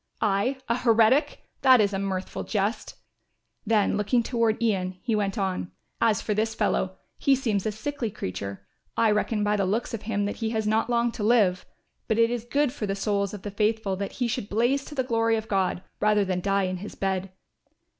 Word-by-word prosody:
"I 210 +6 +1
a 235 - +1
heretic! 235 +3 +3 0.2
That 260 -2 +7
is 205 -1 +2
a 195 - -1
mirthful 190 -1 -3
jest." 210 +2 -2 0.7
Then 215 -2 +2
looking 220 +4 +2
toward 230 -2 +1
Ian 190 -5 0
he 230 - 0
went 205 +1 -1
on, 190 -3 -2 0.3
"As 225 -2 +2
for 215 - 0
this 220 +1 -1
fellow, 190 -3 0 0.2
he 275 - +4
seems 220 -6 -1
a - - 0
sickly 235 +3 -3
creature; 100 - -6 0.3
I 225 -2 +4
reckon 210 0 0
by 210 0 +2
the 195 - +1
looks 220 +6 -1
of 225 - -3
him 205 -2 -1
that 205 - -3
he 225 - -2
has 220 -1 -1
not 220 +2 +1
long 235 0 +2
to 225 - -5
live. 205 -5 +3 0.4
But 220 - +1
it 230 0 +4
is 240 -1 -3
good 280 +1 +1
for 215 -7 -4
the 195 - -1
souls 200 -1 0
of 200 - -10
the 205 - -5
faithful 210 -1 0
that 200 0 -4
he 245 - -1
should 235 -3 -3
blaze 240 +6 +1
to 295 - -9
the 260 - +1
glory 230 -2 +1
of 220 0 -5
God 190 -3 0 0.2
rather 210 -1 +3
than 185 -1 -1
die 195 +1 +1
in 185 0 -2
his 205 +4 -8
bed. 190 -1 -2
215 Hz, 210 wpm, -26 LUFS, 195-230 Hz, 0.7 s, That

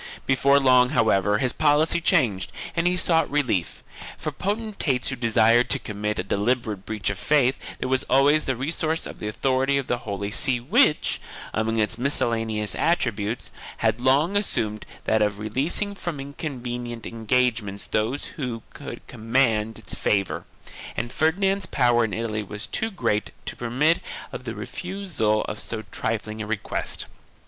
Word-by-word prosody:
3 - - -13
Before 140 +1 +4
long 125 -2 +5
however 105 -1 +3
his 125 +2 +2
policy 155 +2 +3
changed 105 - +2 0.2
and 170 +1 +2
he 180 0 +2
sought 165 -2 +2
relief. 125 -12 -1 0.3
For 155 - -3
potentates 195 - -1
who 135 - -2
desired 115 0 +4
to - - +2
commit 105 0 -3
a - - -1
deliberate 105 0 -1
breach 105 -2 -1
of 100 - -6
faith 135 -4 +1
there - - -3
was 130 0 +1
always 140 +4 +4
the 135 - 0
resource 160 +5 -1
of - - -8
the 105 - -4
authority 135 +5 +1
of 135 - -1
the 120 - -1
Holy 100 -1 -4
See 125 +3 +4
which, 155 - +3 0.3
among 110 0 0
its 110 +1 0
miscellaneous 115 -5 +1
attributes, 120 -9 0 0.3
had 120 - +1
long 140 +9 +3
assumed 110 - -1 0.2
that 110 0 +2
of 105 -1 +1
releasing 135 - -1
from 175 -6 -5
inconvenient 125 -5 -5
engagements 115 -3 0
those 115 +7 -1
who 125 -6 -4
could - - -8
command 115 -2 +1
its - - -4
favor, 100 -2 0 0.5
and 120 - -2
Ferdinand's 195 +5 +1
power 120 -3 +3
in 105 - -5
Italy 110 -1 -2
was 105 0 -6
too 225 - -2
great 110 - -1 0.2
to - - -5
permit 135 +8 +2 0.3
of 125 - -7
the 115 -2 -4
refusal 170 - -1
of 105 - -5
so 110 -1 -5
trifling 110 -1 -3
a 105 - -4
request. 110 -2 -3
120 Hz, 155 wpm, -24 LUFS, 110-145 Hz, 0.5 s, long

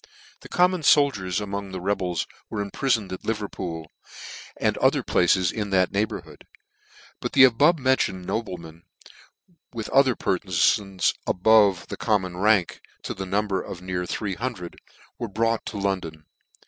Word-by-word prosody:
The - - -13
common 180 0 +2
foldiers 130 - +3
.in 105 -1 -6
iong 100 -1 -4
the 95 - -5
rebels 90 -2 -1 0.2
were 105 -2 -3
impri 135 +7 -2
toned 105 -6 0
at 95 - -6
Liverpool, 95 -7 -4 0.7
and - - +1
other - - +3
places 90 0 +2
in 105 -2 -4
that 95 -2 +2
neighbourhood; 105 +2 -4 0.7
but - - -4
the 135 - +7
above 140 +7 +5
mentioned 130 -9 0
noblemen, 85 -7 -5 0.9
with 110 -2 -4
other 135 -3 +4
perfons 95 +1 +1
above 100 -2 +4
the - - -5
common 95 -5 0
rank, 100 -2 +2 0.2
to - - -4
the 95 0 -6
number 100 0 0
of 90 -1 -9
near 90 -1 -3
three 100 0 -3
hundred, 105 -5 -5 0.4
were 120 - -3
brought 115 +2 -1
to 105 - -5
London. 90 -6 -3
100 Hz, 150 wpm, -24 LUFS, 90-110 Hz, 0.9 s, the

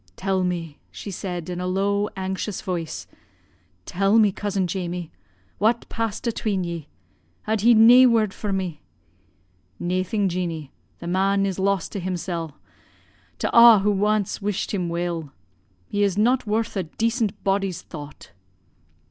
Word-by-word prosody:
'Tell 190 -1 0
me,' 170 -4 -3
she 200 - -8
said 180 -3 -5
in 180 0 -4
a 180 - -2
low 200 +2 0
anxious 190 +1 -3
voice, 170 -4 -4 0.8
'tell 195 +4 +2
me, 215 -3 +5
cousin 195 -1 -2
Jamie, 175 -2 -4 0.5
what 230 +3 +2
passed 225 -1 -3
atween 215 -4 -1
ye. 170 -3 -5 0.6
Had 215 -1 -1
he 235 +2 +6
nae 240 +4 +8
word 220 -4 +2
for 210 - -4
me?' 185 -6 -3 1.0
"'Naething, 185 +3 0
Jeanie, 170 -5 -3 0.3
the - - -10
man 195 +3 +2
is 195 -1 -2
lost 195 -2 0
to 200 - -4
himsel', 175 -4 -4 0.8
to - - -1
a' 235 -1 +10
who 205 -1 +1
ance 210 -1 0
wished 205 +1 -2
him 180 -4 -1
weel. 170 -3 -3 0.6
He 205 - -2
is 200 -2 +2
not 245 +3 +2
worth 220 +2 -1
a 195 - +1
decent 220 +4 -2
body's 195 -2 0
thought.' 150 -2 -10
195 Hz, 145 wpm, -23 LUFS, 175-210 Hz, 1.0 s, a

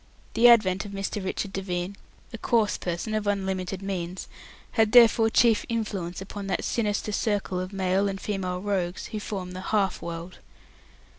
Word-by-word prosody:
The 235 +2 +6
advent 195 -5 +5
of 205 -1 -9
Mr. 195 0 -3
Richard 190 +1 -3
Devine 185 0 -3 0.4
a - - -4
coarse 220 -3 +2
person 175 +5 -3
of 215 -1 -1
unlimited 190 -1 -2
means 185 -2 -4 0.4
had 220 -2 +2
therefore 230 -2 +7
chief 225 0 +4
influence 200 -6 -3
upon 200 +1 -7
that 190 - -1
sinister 210 -2 -1
circle 205 -4 -1
of 185 +1 -4
male 195 0 +1
and 195 0 -4
female 185 -3 -3
rogues 190 -3 -2
who 215 - -3
form 190 -3 -5
the 185 0 -6
"half 195 -2 0
world". 170 +1 -7
195 Hz, 160 wpm, -26 LUFS, 185-210 Hz, 0.4 s, therefore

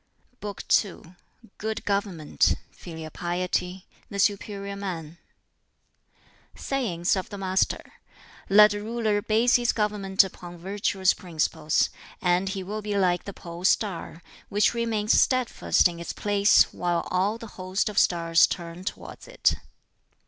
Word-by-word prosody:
] 250 - -39
BOOK 205 -1 -6 0.2
II 185 -3 -12 0.5
Good 220 +1 -4
Government 200 -7 +1 0.2
Filial 160 -2 -9
Piety 180 +2 -2 0.2
The 200 - -6
Superior 200 0 -1
Man 170 -5 -6 1.4
Sayings 200 -12 -1
of 190 - -4
the 205 - -7
Master: 190 -1 0 0.7
"Let 210 +1 +7
a 205 - -4
ruler 215 -1 -1
base 225 +4 +3
his 240 -1 +1
government 205 -3 +2
upon 175 -2 -9
virtuous 190 +1 0
principles, 160 -2 0 0.3
and 180 +1 +1
he 190 -1 -4
will 210 +3 -5
be 205 -1 -2
like 180 -2 +1
the 200 - -5
pole 170 0 -9
star, 185 -4 0 0.3
which 205 +3 +2
remains 225 -2 +2
steadfast 255 -6 +2
in 170 -1 -8
its 170 - -5
place, 205 -1 +3
while 175 -1 -1
all 195 +4 +1
the 230 - -9 0.2
host 185 +1 -1
of 210 -2 +1
stars 165 -1 +4
turn 170 0 -6
towards - - -7
it. - - +2
195 Hz, 135 wpm, -26 LUFS, 175-210 Hz, 1.4 s, Let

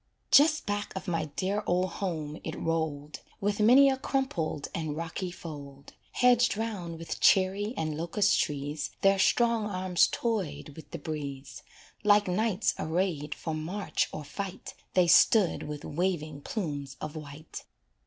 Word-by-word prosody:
Just 310 +2 +6
back 205 0 -2
of 190 - -6
my 165 -3 0
dear 200 +2 0
old 180 0 +1
home 160 -6 -4
it 160 - -5
rolled, 155 -3 -2 0.2
With 205 +1 -1
many 250 +6 +7
a 265 -1 +2
crumpled 195 - -2
and 155 -2 -3
rocky 170 +3 -4
fold, 140 -5 -10 0.2
Hedged 245 -3 +4
'round 195 -7 -4
with 165 0 -6
cherry 200 +4 +3
and 155 -1 -2
locust 175 +6 +1
trees 145 +1 -2
Their 195 0 +4
strong 230 +1 +3
arms 185 -2 +2
toyed 185 -12 -2
with 155 +2 -12
the 170 - -6
breeze 145 -3 -6 0.4
Like 205 -1 +5
knights 210 +3 +1
arrayed 160 -3 -1
for 160 - -4
march 170 +7 -2
or 155 - -6
fight 190 +5 -6 0.2
They 180 -1 +5
stood 180 +3 +5
with 150 0 -6
waving 155 -3 -2
plumes 145 - -4
of 155 +1 -6
white. 155 0 -9
175 Hz, 145 wpm, -29 LUFS, 155-205 Hz, 0.4 s, many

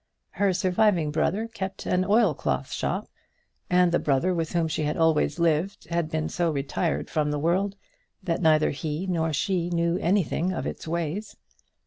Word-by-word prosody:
Her 200 -1 +1
surviving 180 -3 +2
brother 190 +8 0
kept 195 -4 -6
an 180 0 +1
oilcloth 205 - +1
shop, - - -2 0.6
and 180 -1 +4
the 175 - +2
brother 150 +6 +1
with 165 -2 -2
whom 170 -2 +1
she 155 - -2
had 150 0 -1
always 160 -2 +2
lived 170 +3 0
had 170 -2 0
been 155 -1 -1
so 175 -1 0
retired 150 +3 -1
from 150 -1 0
the 150 - -1
world 185 +6 0 0.5
that 170 -1 -1
neither 155 -2 +4
he 155 +4 -3
nor 165 -3 0
she 175 +3 0
knew 170 0 +1
anything 185 -1 +1
of - - -3
its - - -5
ways. 170 +5 -3
170 Hz, 165 wpm, -26 LUFS, 155-185 Hz, 0.6 s, and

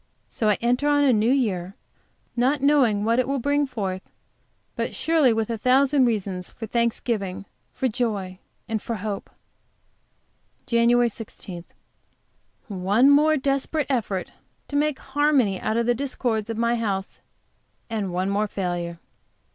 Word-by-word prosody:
So 215 - 0
I 210 - +3
enter 250 +5 +1
on 290 0 +4
a 270 -3 +5
new 220 +1 +2
year, 200 -8 0 0.6
not 260 +4 +2
knowing 260 -7 +3
what 230 +2 +2
it 255 - +1
will 275 +1 0
bring 285 +2 +1
forth, 195 -7 -3 0.7
but - - -3
surely 315 -6 +3
with 225 0 -1
a 225 - -3
thousand 265 +3 +4
reasons 195 -6 -2
for 225 - -8
thanksgiving, 220 -4 -1 0.3
for 260 - -1
joy, 205 -6 -2 0.3
and 220 -2 -2
for 230 - -3
hope. 205 -1 -5 1.4
JAN. 235 +1 +3
16. 195 -6 -8 1.0
One 205 +6 +3
more 305 +2 +5
desperate 275 +3 0
effort 210 -7 -2 0.4
to 285 - -5
make 295 -1 +1
harmony 270 -8 +1
out 215 +1 -1
of 235 - +1
the 245 - +3
discords 235 -4 -2
of 225 - -3
my 235 +1 +1
house, 200 -4 -3 0.7
and 215 -5 -3
one 185 +2 -1
more 210 +2 +1
failure. 175 -3 -3
230 Hz, 145 wpm, -24 LUFS, 200-265 Hz, 1.4 s, a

